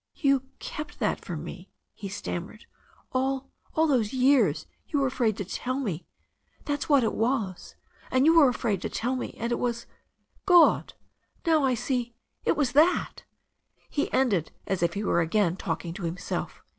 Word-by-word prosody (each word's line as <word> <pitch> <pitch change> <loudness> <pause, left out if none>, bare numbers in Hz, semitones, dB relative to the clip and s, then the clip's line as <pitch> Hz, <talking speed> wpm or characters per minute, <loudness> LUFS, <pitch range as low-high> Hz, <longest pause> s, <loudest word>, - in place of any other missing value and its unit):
''You 275 -3 +3 0.2
kept 300 0 -7
that 215 - -1
from 160 -5 -5
me," 180 +2 -9 0.2
he 200 - -7
stammered. 190 +2 -6 0.5
"All 265 +1 0 0.3
those 270 -9 +2
years 260 +1 +3 0.2
you 300 - -1
were 275 - +2
afraid 240 -5 0
to 200 - -3
tell 255 +7 -3
me 185 - -3 0.3
— - - -34
^that's 290 +1 -2
what 280 -4 +5
it 220 - 0
was. 225 -6 -1 0.3
And 260 +2 +3
you 325 - +6
yrere 315 -5 +7
afraid 220 -6 -1
to - - -3
tell 250 +3 -1
me. 255 - -5
And 235 +2 -2
it 240 - 0
was 235 -1 -1
that - - -30 0.3
— - - -38
God! 350 -3 +5 0.5
now; 320 -3 +4
I 260 -2 +3
see 245 0 -2
— - - -38
it - - +2
was 275 -5 +1
that 310 +7 +2 0.3
" - - -39
He 290 - -1
ended 205 - +1
as 190 -3 -1
if 170 - +1
he 205 - -2
were 175 - +2
again 175 +1 +1
talking 170 -2 -4
to 175 - -8
himself. 170 +2 -4
245 Hz, 185 wpm, -27 LUFS, 195-275 Hz, 0.5 s, yrere